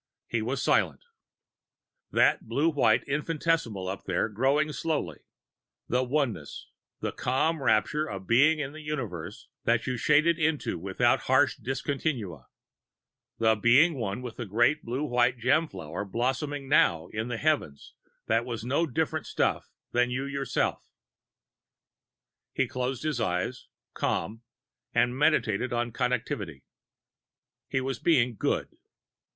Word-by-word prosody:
He -, -, -1 dB
was -, -, -2 dB
silent. -, -, +2 dB, 1.1 s
That -, -, +2 dB
blue 155 Hz, +4 st, +2 dB
white 120 Hz, -7 st, +3 dB
infinitesimal 150 Hz, -, -1 dB
up 95 Hz, +1 st, -5 dB
there 95 Hz, +4 st, 0 dB
growing 135 Hz, +8 st, +1 dB
slowly 145 Hz, -, -2 dB, 0.7 s
the 125 Hz, +2 st, +1 dB
oneness, 125 Hz, -, -2 dB, 0.3 s
the -, -, -2 dB
calm 155 Hz, +5 st, 0 dB
rapture 150 Hz, +5 st, +2 dB
of 95 Hz, -6 st, -6 dB
Being 145 Hz, -, +5 dB
in 145 Hz, -1 st, -4 dB
a 155 Hz, -, -9 dB
universe 110 Hz, -, -5 dB, 0.2 s
that 120 Hz, 0 st, +2 dB
you 130 Hz, -1 st, -2 dB
shaded 155 Hz, +6 st, +3 dB
into 155 Hz, -, 0 dB
without 100 Hz, +7 st, +2 dB
harsh 130 Hz, +1 st, +4 dB
discontinua, 125 Hz, -, -3 dB, 0.9 s
the 110 Hz, -1 st, +4 dB
being 120 Hz, +10 st, +5 dB
one 115 Hz, -3 st, -4 dB
with 120 Hz, -2 st, -7 dB
the 120 Hz, -, -5 dB
great 120 Hz, +9 st, +2 dB
blue 125 Hz, +5 st, -3 dB
white 125 Hz, -2 st, +2 dB
gem 145 Hz, +7 st, +2 dB
flower 80 Hz, -, -6 dB
blossoming 135 Hz, +6 st, -2 dB
now 85 Hz, -, +3 dB
in 110 Hz, +2 st, -3 dB
the 120 Hz, -2 st, -3 dB
heavens 145 Hz, -, -1 dB, 0.3 s
that 115 Hz, +1 st, +2 dB
were 120 Hz, -1 st, -4 dB
no 140 Hz, +7 st, +1 dB
different 155 Hz, +2 st, -2 dB
stuff -, -, 0 dB, 0.2 s
than 125 Hz, 0 st, +2 dB
you 130 Hz, +2 st, -2 dB
yourself 140 Hz, -1 st, -1 dB, 1.7 s
He -, -, +1 dB
closed 125 Hz, +1 st, -3 dB
his 150 Hz, -6 st, -1 dB
eyes, 90 Hz, +5 st, -2 dB, 0.3 s
calm, 110 Hz, +7 st, -2 dB, 0.5 s
and 120 Hz, +1 st, +3 dB
meditated 125 Hz, -5 st, +2 dB
on 120 Hz, 0 st, -1 dB
Connectivity. 115 Hz, -, -2 dB, 1.0 s
He 130 Hz, -, -1 dB
was 130 Hz, -1 st, -3 dB
being 130 Hz, -7 st, +3 dB
Good. -, -, -2 dB
125 Hz, 130 wpm, -28 LUFS, 110-145 Hz, 1.7 s, Being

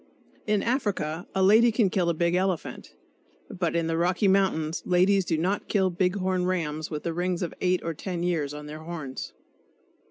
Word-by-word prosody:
In 210 Hz, -1 st, +1 dB
Africa 195 Hz, -, -1 dB
a 190 Hz, -, +2 dB
lady 220 Hz, +5 st, +6 dB
can 215 Hz, -4 st, +2 dB
kill 180 Hz, -3 st, +1 dB
a 170 Hz, -, 0 dB
big 170 Hz, +1 st, +1 dB
elephant, 180 Hz, -, -2 dB, 0.6 s
but 170 Hz, -2 st, -2 dB
in 170 Hz, -1 st, +1 dB
the 165 Hz, 0 st, -1 dB
Rocky 180 Hz, +3 st, +2 dB
Mountains 185 Hz, -5 st, +1 dB
ladies 185 Hz, +2 st, +3 dB
do 165 Hz, -, 0 dB
not 185 Hz, +6 st, -1 dB
kill 190 Hz, -2 st, +2 dB
big 180 Hz, +2 st, 0 dB
horn 185 Hz, -2 st, 0 dB
rams 155 Hz, -4 st, -2 dB
with 150 Hz, -2 st, -5 dB
the 170 Hz, -, -2 dB
rings 180 Hz, +1 st, -1 dB
of 170 Hz, -, -4 dB
eight 180 Hz, 0 st, +1 dB
or 165 Hz, -, -2 dB
ten 175 Hz, +2 st, -4 dB
years 160 Hz, -5 st, 0 dB
on 150 Hz, 0 st, -8 dB
their 150 Hz, +1 st, -8 dB
horns. 160 Hz, -5 st, -6 dB
180 Hz, 190 wpm, -26 LUFS, 165-190 Hz, 0.6 s, lady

